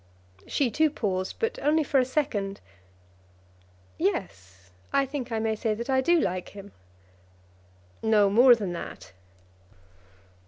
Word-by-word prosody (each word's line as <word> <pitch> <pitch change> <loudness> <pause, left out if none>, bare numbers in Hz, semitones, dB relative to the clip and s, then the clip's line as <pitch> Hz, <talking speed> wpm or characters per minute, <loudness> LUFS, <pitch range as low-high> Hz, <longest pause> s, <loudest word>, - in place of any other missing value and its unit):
She 265 -5 0
too 310 +7 +3
paused, 190 -9 -3
but 455 +1 -2
only 310 +2 +2
for 275 -1 +2
a 255 - +2
second. 210 -8 -2 1.4
"Yes, 95 - -4 0.2
I 275 - +2
think 265 -3 -6
I 225 - -1
may 220 0 0
say 215 0 -1
that 235 +5 -4
I 260 0 +3
do 340 +5 +3
like 185 - -2
him." 200 0 -10 1.3
"No 215 -2 +4
more 240 +5 +6
than 200 -6 -4
that?" 95 - -8
220 Hz, 130 wpm, -26 LUFS, 195-270 Hz, 1.4 s, more